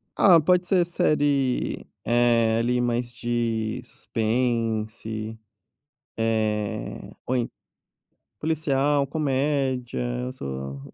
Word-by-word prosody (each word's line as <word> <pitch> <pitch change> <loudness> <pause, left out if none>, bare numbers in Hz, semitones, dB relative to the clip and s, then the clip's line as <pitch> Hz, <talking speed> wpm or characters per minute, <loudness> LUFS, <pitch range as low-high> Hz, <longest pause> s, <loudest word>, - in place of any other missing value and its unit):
Ah, 175 -4 +7
pode 180 +3 +3
ser 180 -3 +3
série, 145 -6 +1 0.2
eh, 115 -1 +3
ali 125 +1 +1
mais 120 0 -1
de 115 -2 -1
suspense, 110 -1 -2 0.8
eh, 110 -2 -1 0.2
ou 130 - +1
en 120 -2 0 0.9
policial, 145 -2 +1
comédia, 135 -3 0 0.2
eu 125 +1 -4
sou 70 - -6
120 Hz, 90 wpm, -25 LUFS, 110-140 Hz, 0.9 s, Ah